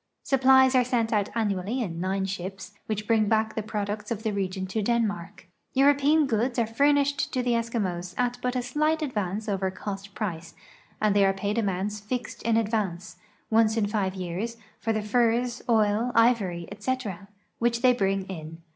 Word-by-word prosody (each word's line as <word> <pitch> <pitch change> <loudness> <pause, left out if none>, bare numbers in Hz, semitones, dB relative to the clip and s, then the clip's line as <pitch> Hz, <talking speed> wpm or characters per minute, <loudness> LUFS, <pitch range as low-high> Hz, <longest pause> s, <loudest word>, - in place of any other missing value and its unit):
Supplies 265 -1 +5
are 255 -1 +5
sent 235 -2 0
out 205 -2 +1
annually 210 +1 -1
in 175 -9 -3
nine 190 +1 -1
shii)s, 190 0 -6 0.2
which 215 -1 -3
luring 220 -2 +3
back 220 0 +2
the 220 - -2
products 210 0 -4
of 220 -2 -3
the 220 - 0
region 190 -1 -2
to 190 +4 -2
Denmark. 210 -5 -1 0.3
Euroi)ean 285 +2 +4
goods 240 0 0
are 235 - +3
furnished 285 +4 +2
to 255 -2 -1
the 245 - +1
Eskimos 200 -7 -2
at 245 0 0
but 250 0 -1
a 250 - 0
slight 305 +5 0
advance 210 -5 -2
over 195 -2 0
cost 195 +1 -7
price, 170 -6 -4 0.4
and 210 -2 +2
they 200 - +5
are 195 0 +4
paid 205 +3 -1
amounts 205 0 -1
fixed 240 +3 -5
in 230 0 +2
advance, 205 -6 -2 0.3
once 220 0 +4
in 215 - +2
five 200 -2 -1
years, 190 +6 -4 0.2
for 225 - -1
the 215 -1 -1
furs, 240 +2 +1
oil, 220 +1 +2
ivory, 210 -8 +2
etc., 205 -3 -4 0.3
which 235 +1 0
they 255 -1 +6
bring 195 -4 0
in. 165 -4 -7
215 Hz, 175 wpm, -26 LUFS, 195-240 Hz, 0.4 s, they